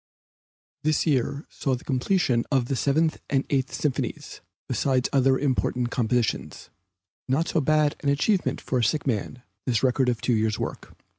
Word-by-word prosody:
This 155 +1 +1
year 140 -1 0
saw 135 -2 -2
the 125 - -10
completion 130 -2 +1
of 135 -3 +2
the 135 - -2
Seventh 155 +5 +1
and 135 -1 +1
Eighth 135 -2 +1
Symphonies 145 -4 -3 0.3
besides 130 -2 +1
other 135 -1 +4
important 125 -3 0
compositions; 115 - -1 0.6
not 145 +6 +1
so 160 - +1
bad 150 0 +2
an 145 - -1
achievement 180 +8 +1
for 130 - -1
a - - +1
sick 150 +7 +1
man, 125 0 -2 0.2
this 120 -1 +1
record 130 0 +2
of 120 -2 -1
two 125 - 0
years' 110 -1 +1
work. - - -6
135 Hz, 160 wpm, -25 LUFS, 125-145 Hz, 0.6 s, other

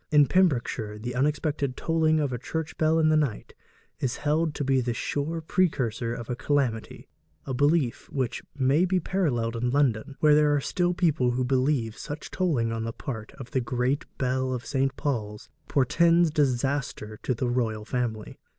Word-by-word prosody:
In 150 -2 +6
Pembrokeshire 125 - +1
the 120 +3 -5
unexpected 140 0 0
tolling 160 -1 +2
of 145 -4 -1
a 120 - -3
church 160 +5 -4
bell 160 +1 +3
in 160 -1 +4
the 155 - +4
night 145 -8 -1 0.5
is 125 -2 -1
held 155 +1 0
to - - -2
be 135 -1 +2
the 120 -1 -2
sure 155 +6 -2
precursor 130 -10 0
of 120 -1 -5
a 125 - -2
calamity 130 -5 -1 0.4
a 135 - -3
belief 145 -1 +1
which 130 -4 -2 0.2
may 140 +5 +3
be 185 0 +2
paralleled 130 -12 -1
in 120 +1 0
London, 135 0 +1
where 150 -1 +5
there 150 0 +4
are - - +2
still 175 +4 0
people 155 -8 +2
who 125 +1 0
believe 130 -3 +1
such 145 +2 -7
tolling 140 -12 0
on 115 0 -2
the 115 - -3
part 115 -2 -6
of 135 -3 -10
the 130 - +1
great 125 +3 -1
bell 130 0 0
of 120 - -6
St. 135 -1 0
Paul's 105 -7 -3 0.2
portends 165 +5 +3
disaster 135 -6 -1
to 125 - -1
the 125 - -1
royal 115 -3 -1
family. 115 -3 -3
135 Hz, 180 wpm, -26 LUFS, 120-150 Hz, 0.5 s, In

